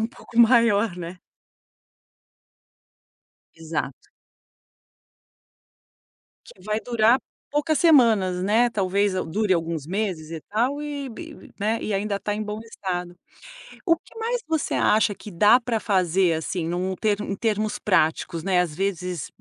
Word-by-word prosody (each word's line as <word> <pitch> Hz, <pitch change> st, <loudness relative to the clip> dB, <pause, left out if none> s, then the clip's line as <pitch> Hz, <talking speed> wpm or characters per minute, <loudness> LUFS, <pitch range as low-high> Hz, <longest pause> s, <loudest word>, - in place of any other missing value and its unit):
um 220 Hz, -, +1 dB
pouco 235 Hz, -1 st, -9 dB
maior, 230 Hz, -4 st, +5 dB
né. 175 Hz, +1 st, -7 dB, 2.4 s
Exato. 160 Hz, -4 st, -5 dB, 2.4 s
Que 185 Hz, -, -16 dB
vai 215 Hz, +2 st, -1 dB
durar 235 Hz, +1 st, +3 dB, 0.3 s
poucas 295 Hz, +1 st, +1 dB
semanas, 220 Hz, -, +4 dB
né, 225 Hz, +5 st, +3 dB
talvez 200 Hz, -2 st, 0 dB
dure 190 Hz, +3 st, 0 dB
alguns 165 Hz, -4 st, -2 dB
meses 185 Hz, -5 st, -3 dB
e 165 Hz, -1 st, -6 dB
tal, 250 Hz, -, -1 dB
e 290 Hz, -2 st, -5 dB
e, 320 Hz, -4 st, -11 dB
né, 220 Hz, +3 st, 0 dB
e 215 Hz, -, -3 dB
ainda 200 Hz, +1 st, -1 dB
está 205 Hz, +1 st, -3 dB
em 215 Hz, -, -3 dB
bom 210 Hz, 0 st, -5 dB
estado. 180 Hz, -5 st, -5 dB, 0.7 s
O 335 Hz, -, +4 dB
que 390 Hz, -, -19 dB
mais 470 Hz, +2 st, -2 dB
você 320 Hz, -2 st, -1 dB
acha 215 Hz, -1 st, +3 dB
que 210 Hz, -, -11 dB
dá 210 Hz, +7 st, +5 dB
para 235 Hz, -2 st, -2 dB
fazer, 185 Hz, -3 st, +2 dB
assim, 160 Hz, +3 st, -3 dB
em 165 Hz, +2 st, -3 dB
um 185 Hz, +1 st, -2 dB
ter 210 Hz, 0 st, 0 dB
em 200 Hz, -1 st, -3 dB
termos 215 Hz, 0 st, -1 dB
práticos, 165 Hz, -3 st, +1 dB
né, 185 Hz, -1 st, +2 dB
às 165 Hz, -4 st, -3 dB
vezes, 180 Hz, -2 st, -3 dB
205 Hz, 140 wpm, -24 LUFS, 180-230 Hz, 2.4 s, maior